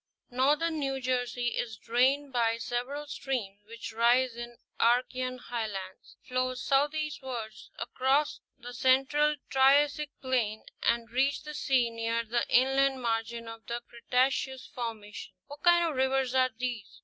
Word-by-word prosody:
NortHern 300 Hz, +6 st, +2 dB
New 270 Hz, -2 st, -1 dB
Jersey 245 Hz, -1 st, -1 dB
is 225 Hz, -2 st, -3 dB
drained 265 Hz, +5 st, +1 dB
by 230 Hz, -2 st, +2 dB
several 250 Hz, +5 st, -3 dB
streams 245 Hz, -8 st, -4 dB
which 230 Hz, 0 st, -8 dB
rise 240 Hz, +2 st, +3 dB
in 240 Hz, 0 st, -7 dB, 0.3 s
the -, -, +3 dB
Archean 255 Hz, +1 st, +1 dB
Highlands, 215 Hz, -6 st, -6 dB
flow 255 Hz, 0 st, -1 dB
southeastward 275 Hz, -4 st, -1 dB, 0.3 s
across 265 Hz, +5 st, +1 dB, 0.2 s
the 245 Hz, +1 st, -9 dB
central 270 Hz, +4 st, +3 dB, 0.2 s
Triassic 285 Hz, +2 st, +4 dB
plain 240 Hz, -5 st, -1 dB, 0.2 s
and 235 Hz, -1 st, 0 dB
reach 275 Hz, +4 st, +1 dB
the 300 Hz, 0 st, -7 dB
sea 260 Hz, -5 st, +1 dB
near 230 Hz, 0 st, -1 dB
the 235 Hz, +2 st, -1 dB
inland 270 Hz, +1 st, +3 dB
margin 230 Hz, 0 st, -2 dB
of 225 Hz, 0 st, -10 dB
the 235 Hz, 0 st, -3 dB
Cretaceous 255 Hz, +2 st, 0 dB
formation. 220 Hz, -4 st, -6 dB
What 290 Hz, +1 st, -11 dB
kinds 345 Hz, -1 st, +4 dB
of -, -, -6 dB
rivers 265 Hz, -1 st, +1 dB
are 255 Hz, -1 st, +4 dB
these? 245 Hz, -4 st, -5 dB
255 Hz, 135 wpm, -29 LUFS, 235-270 Hz, 0.3 s, Triassic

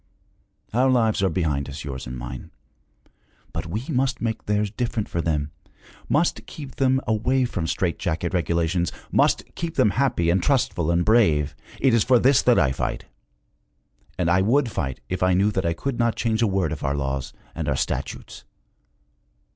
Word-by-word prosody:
Our 130 Hz, +3 st, +3 dB
lives 115 Hz, -5 st, +2 dB
are 95 Hz, -, +3 dB
behind 75 Hz, -5 st, -1 dB
us, 75 Hz, +2 st, -7 dB
yours 65 Hz, -4 st, -6 dB
and 65 Hz, 0 st, -6 dB
mine. -, -, -7 dB, 1.0 s
But -, -, -4 dB
we 110 Hz, +9 st, -4 dB
must 135 Hz, +1 st, 0 dB
make 115 Hz, -2 st, -3 dB
theirs 105 Hz, -1 st, 0 dB
different 115 Hz, -2 st, -2 dB
for 85 Hz, -, -2 dB
them, 75 Hz, -3 st, -1 dB, 0.6 s
must 155 Hz, +4 st, +1 dB
keep 140 Hz, -5 st, -9 dB
them 130 Hz, -1 st, +3 dB
away 125 Hz, +4 st, +1 dB
from 90 Hz, -8 st, -3 dB
strait 85 Hz, 0 st, -1 dB
jacket 85 Hz, +1 st, -2 dB
regulations, 85 Hz, 0 st, 0 dB, 0.2 s
must -, -, +3 dB
keep 165 Hz, -1 st, -4 dB
them 105 Hz, -, +4 dB
happy 110 Hz, -11 st, +1 dB
and 90 Hz, +1 st, +2 dB
trustful 105 Hz, -, +1 dB
and 85 Hz, +1 st, +2 dB
brave! 80 Hz, -11 st, +3 dB, 0.2 s
It 135 Hz, -3 st, +3 dB
is 115 Hz, -3 st, +4 dB
for 130 Hz, -, +4 dB
this 130 Hz, +2 st, +4 dB
that 125 Hz, -1 st, +4 dB
I 70 Hz, -5 st, +3 dB
fight! 65 Hz, -, -3 dB, 1.1 s
And 90 Hz, -, 0 dB
I 90 Hz, +2 st, +4 dB
would 120 Hz, +4 st, +2 dB
fight 70 Hz, -9 st, -3 dB
if 90 Hz, -, -3 dB
I 90 Hz, 0 st, +3 dB
knew 100 Hz, +3 st, +3 dB
that 95 Hz, -4 st, -1 dB
I 85 Hz, -, +1 dB
could 125 Hz, +8 st, -4 dB
not 115 Hz, -1 st, +2 dB
change 115 Hz, -1 st, 0 dB
a 115 Hz, -, +4 dB
word 95 Hz, -6 st, 0 dB
of 80 Hz, -, -5 dB
our 70 Hz, 0 st, 0 dB
laws 70 Hz, -1 st, -3 dB, 0.2 s
and 80 Hz, -3 st, -3 dB
our 65 Hz, -, 0 dB
statutes!' -, -, -4 dB
95 Hz, 180 wpm, -24 LUFS, 80-120 Hz, 1.1 s, them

